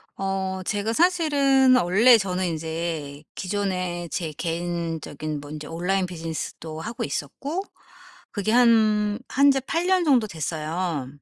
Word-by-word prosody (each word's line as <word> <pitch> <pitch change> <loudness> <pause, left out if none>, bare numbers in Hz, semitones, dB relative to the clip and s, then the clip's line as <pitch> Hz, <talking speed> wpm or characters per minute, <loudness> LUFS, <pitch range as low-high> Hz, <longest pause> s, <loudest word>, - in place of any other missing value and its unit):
어 190 -1 -2
제가 205 +3 -1
사실은 280 -5 +4
원래 225 +4 +6
저는 185 -2 -1
인제 160 -3 -4
기존에 185 -3 -2
제 165 -3 -3
개인적인 165 -2 -4
뭐 145 - -11
인제 150 0 -7
온라인 180 +5 -1
비즈니스도 160 -2 -6
하고 230 +6 -4
있었고 275 - -4 0.7
그게 205 0 -1
한 215 -3 +4
한 280 +2 +5
지 270 - +1
8 335 +5 -1
년 375 -1 +3
정도 255 -7 +4
됐어요. 160 -2 -3
185 Hz, 250 characters per minute, -24 LUFS, 165-230 Hz, 0.7 s, 원래